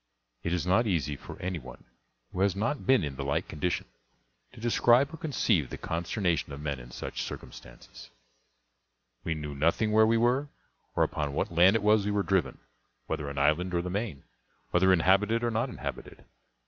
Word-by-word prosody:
It 85 Hz, -, -2 dB
is 90 Hz, 0 st, 0 dB
not 95 Hz, +6 st, +3 dB
easy 75 Hz, -6 st, 0 dB
for -, -, -10 dB
any 90 Hz, -2 st, -3 dB
one 65 Hz, -2 st, -12 dB, 0.5 s
who -, -, -4 dB
has 100 Hz, -1 st, +3 dB
not 115 Hz, +8 st, -2 dB
been 130 Hz, -7 st, +5 dB
in 70 Hz, -3 st, -4 dB
the 70 Hz, -, -3 dB
like 70 Hz, +1 st, -1 dB
condition 85 Hz, +4 st, -2 dB, 0.7 s
to 125 Hz, -, -14 dB
describe 120 Hz, +5 st, +3 dB
or -, -, -6 dB
conceive 110 Hz, -, +1 dB
the -, -, -6 dB
consternation 85 Hz, -1 st, -1 dB
of 70 Hz, -, -7 dB
men 70 Hz, -3 st, -3 dB
in -, -, -11 dB
such -, -, -5 dB
circumstances. -, -, -10 dB, 1.1 s
We 85 Hz, -, -1 dB
knew 75 Hz, -1 st, -5 dB
nothing 85 Hz, +9 st, +1 dB
where 110 Hz, +1 st, +5 dB
we 115 Hz, +1 st, +3 dB
were, 125 Hz, +5 st, +2 dB, 0.5 s
or -, -, +3 dB
upon 75 Hz, -2 st, -2 dB
what 75 Hz, -, -1 dB
land 90 Hz, +5 st, +6 dB
it 110 Hz, -, +1 dB
was 105 Hz, 0 st, +4 dB
we 105 Hz, -, -1 dB
were 100 Hz, -1 st, +1 dB
driven; 90 Hz, -11 st, 0 dB, 0.5 s
whether 75 Hz, -1 st, -3 dB
an 70 Hz, -, -7 dB
island 75 Hz, +6 st, +2 dB
or 85 Hz, -, +1 dB
the 90 Hz, -, -4 dB
main, 100 Hz, -8 st, -3 dB, 0.5 s
whether 95 Hz, +2 st, +4 dB
inhabited 100 Hz, +6 st, +3 dB
or 120 Hz, -, +1 dB
not 115 Hz, +4 st, 0 dB
inhabited. -, -, -7 dB
90 Hz, 185 wpm, -29 LUFS, 75-110 Hz, 1.1 s, land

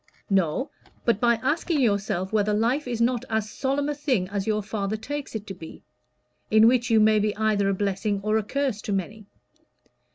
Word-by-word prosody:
"No; 195 Hz, -, +1 dB, 0.3 s
but 235 Hz, -3 st, +2 dB
by 235 Hz, 0 st, +4 dB
asking 310 Hz, +3 st, 0 dB
yourself 200 Hz, -5 st, 0 dB
whether 210 Hz, -1 st, +2 dB
life 245 Hz, +7 st, 0 dB
is 240 Hz, -2 st, -3 dB
not 240 Hz, 0 st, +1 dB
as 220 Hz, -1 st, -1 dB
solemn 275 Hz, +1 st, -1 dB
a 295 Hz, -, 0 dB
thing 265 Hz, -10 st, 0 dB
as 200 Hz, 0 st, -3 dB
your 215 Hz, -1 st, 0 dB
father 205 Hz, 0 st, -3 dB
takes 285 Hz, +4 st, -6 dB
it 215 Hz, -1 st, -4 dB
to 195 Hz, -, -6 dB
be 165 Hz, -3 st, -11 dB, 0.7 s
in 220 Hz, +1 st, +6 dB
which 240 Hz, 0 st, +2 dB
you 225 Hz, -1 st, +5 dB
may 215 Hz, 0 st, +5 dB
be 210 Hz, 0 st, 0 dB
either 210 Hz, -2 st, +1 dB
a -, -, +2 dB
blessing 200 Hz, +1 st, -1 dB
or 215 Hz, +1 st, +1 dB
a -, -, -3 dB
curse 260 Hz, -1 st, -2 dB
to 205 Hz, -, -3 dB
many. 200 Hz, +2 st, -4 dB
215 Hz, 195 wpm, -25 LUFS, 200-245 Hz, 0.7 s, in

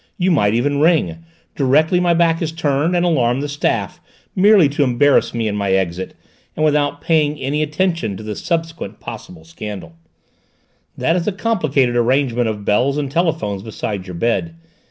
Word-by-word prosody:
You 185 Hz, -1 st, +1 dB
might 105 Hz, -9 st, +2 dB
even 140 Hz, +4 st, 0 dB
ring, 165 Hz, 0 st, +2 dB, 0.4 s
directly 155 Hz, +6 st, +2 dB
my 175 Hz, -1 st, +2 dB
back 165 Hz, 0 st, +2 dB
is 160 Hz, -2 st, -1 dB
turned, 160 Hz, +1 st, 0 dB
and 175 Hz, 0 st, +2 dB
alarm 130 Hz, -7 st, +1 dB
the 145 Hz, -, -3 dB
staff, 145 Hz, +1 st, -2 dB, 0.3 s
merely 195 Hz, -3 st, +5 dB
to 145 Hz, +1 st, 0 dB
embarrass 135 Hz, +2 st, +3 dB
me 115 Hz, -2 st, -2 dB
in 105 Hz, -, -2 dB
my 100 Hz, -2 st, 0 dB
exit, 95 Hz, -1 st, -2 dB, 0.4 s
and 155 Hz, -, +1 dB
without 145 Hz, -1 st, +1 dB
paying 155 Hz, -3 st, +1 dB
any 145 Hz, +3 st, -1 dB
attention 155 Hz, -, -1 dB
to 110 Hz, -, -9 dB
the 105 Hz, -1 st, -5 dB
subsequent 165 Hz, -, -4 dB
possible 105 Hz, -8 st, -9 dB
scandal. 85 Hz, 0 st, -8 dB, 1.0 s
That 165 Hz, -, +1 dB
is 180 Hz, +1 st, -2 dB
a -, -, +2 dB
complicated 155 Hz, -, 0 dB
arrangement 120 Hz, 0 st, +1 dB
of 105 Hz, -2 st, -4 dB
bells 125 Hz, +7 st, +1 dB
and 140 Hz, -2 st, -3 dB
telephones 160 Hz, -, -1 dB
beside 105 Hz, -2 st, -5 dB
your 90 Hz, -, -7 dB
bed! 120 Hz, -, -1 dB
145 Hz, 170 wpm, -18 LUFS, 110-165 Hz, 1.0 s, merely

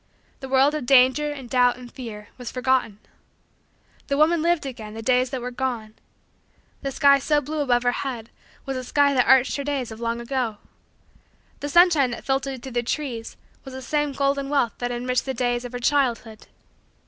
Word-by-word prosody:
The 265 Hz, -, -8 dB
world 270 Hz, +2 st, +4 dB
of 300 Hz, -5 st, -4 dB
danger, 270 Hz, +3 st, +4 dB
and 270 Hz, -4 st, -8 dB
doubt, 245 Hz, 0 st, +3 dB
and 245 Hz, -1 st, -11 dB
fear, 215 Hz, -5 st, -9 dB
was 245 Hz, -2 st, -7 dB
forgotten. 255 Hz, -5 st, 0 dB, 1.1 s
The 280 Hz, -, 0 dB
woman 315 Hz, +2 st, +3 dB
lived 340 Hz, -2 st, +1 dB
again 220 Hz, -5 st, -7 dB
the 225 Hz, -, -7 dB
days 255 Hz, +1 st, +2 dB
that 255 Hz, -1 st, -4 dB
were 250 Hz, +1 st, -5 dB
gone. 240 Hz, -4 st, -3 dB, 0.9 s
The 275 Hz, -, -3 dB
sky 280 Hz, 0 st, +5 dB
so 295 Hz, +2 st, +2 dB
blue 300 Hz, +2 st, -5 dB
above 245 Hz, -4 st, +2 dB
her 245 Hz, -, +3 dB
head 245 Hz, -3 st, -5 dB, 0.3 s
was 270 Hz, -, -3 dB
the 255 Hz, -, -4 dB
sky 280 Hz, +3 st, +2 dB
that 250 Hz, -2 st, +2 dB
arched 265 Hz, 0 st, +4 dB
her 280 Hz, -, -3 dB
days 275 Hz, -5 st, -3 dB
of 220 Hz, -, -9 dB
long 235 Hz, 0 st, -2 dB
ago. 235 Hz, -3 st, -2 dB, 1.0 s
The 290 Hz, -, -4 dB
sunshine 335 Hz, -5 st, +5 dB
that 240 Hz, -, -7 dB
filtered 270 Hz, -1 st, -2 dB
through 265 Hz, -, -7 dB
the 240 Hz, 0 st, 0 dB
trees 240 Hz, -2 st, -4 dB, 0.3 s
was 265 Hz, -1 st, -9 dB
the 260 Hz, -, -7 dB
same 295 Hz, +2 st, 0 dB
golden 275 Hz, 0 st, -1 dB
wealth 275 Hz, -5 st, +1 dB
that 245 Hz, 0 st, -2 dB
enriched 250 Hz, +1 st, -1 dB
the 265 Hz, -1 st, -3 dB
days 245 Hz, 0 st, -1 dB
of 245 Hz, -, -7 dB
her 245 Hz, -, -4 dB
childhood. 240 Hz, -4 st, 0 dB
260 Hz, 195 wpm, -23 LUFS, 245-280 Hz, 1.1 s, sky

